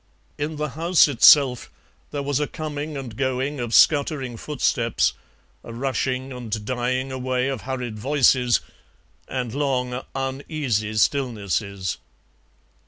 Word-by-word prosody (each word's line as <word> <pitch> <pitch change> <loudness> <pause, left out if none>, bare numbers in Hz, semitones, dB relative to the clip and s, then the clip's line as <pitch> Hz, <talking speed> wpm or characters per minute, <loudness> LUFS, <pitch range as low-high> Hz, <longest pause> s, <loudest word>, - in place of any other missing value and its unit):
In 150 +2 -2
the 150 0 -2
house 165 +5 +4
itself 135 -1 +5 0.4
there 145 -1 -4
was 140 0 0
a 150 - 0
coming 150 -1 -5
and 125 -5 -7
going 130 +2 -1
of 120 -2 -3
scuttering 140 -2 +3
footsteps, 120 -3 0 0.5
a - - -9
rushing 130 +1 -2
and 115 -4 -5
dying 130 +2 -1
away 130 0 -1
of 135 -4 -3
hurried 125 -4 -5
voices, 130 -1 +3 0.7
and 125 -3 -3
long, 130 -3 -1
uneasy 135 -5 -2
stillnesses. 105 - -1
130 Hz, 115 wpm, -23 LUFS, 120-145 Hz, 0.7 s, itself